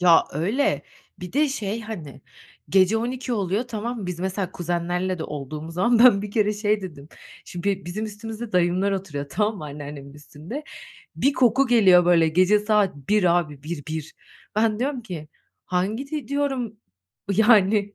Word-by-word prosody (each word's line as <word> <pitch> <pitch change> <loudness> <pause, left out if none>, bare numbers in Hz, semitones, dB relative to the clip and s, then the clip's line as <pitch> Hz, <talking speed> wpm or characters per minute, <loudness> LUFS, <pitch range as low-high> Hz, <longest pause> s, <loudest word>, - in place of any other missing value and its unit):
Ya, 175 -2 +6
öyle. 205 - 0 0.4
Bir 180 +2 -7
de, 295 +2 +3
şey, 220 -5 -3
hani, 170 -12 -8 0.5
gece 195 +3 +4
00.00 250 +2 -3
oluyor, 200 -1 0
tamam 230 +1 -4
mı? 190 - -5
Biz 180 -1 -5
mesela 190 0 -2
kuzenlerle 175 +1 -2
de 160 - -4
olduğumuz 150 +3 -6
zaman 235 +6 +3
ben 235 -5 +7
bir 210 - -5
kere 210 0 +2
şey 210 0 0
dedim, 150 -6 -9 0.4
şimdi 175 +3 -4
be 195 -1 -1
bizim 185 +6 -4
üstümüzde 220 +1 -7
dayımlar 180 +3 +2
oturuyor 155 -8 -4
tamam 210 +7 0
mı? 155 - -7
Anneannemin 145 -1 -8
üstünde. 155 - -9 0.5
Bir 275 - +2
koku 260 +1 +3
geliyor 190 -7 +6
böyle 170 -2 +4
gece 185 +6 +4
saat 210 -5 +1
01.00 175 +4 +2
abi, 150 -5 -5
1 155 0 -5
1! 155 -1 -5 0.4
Ben 215 -1 +2
diyorum 260 0 -2
ki, 165 -7 -7 0.4
hangi 210 +10 -2
de 300 -7 -4
diyorum, 270 -6 -1 0.6
yani 205 -1 +4
195 Hz, 165 wpm, -24 LUFS, 170-225 Hz, 0.6 s, ben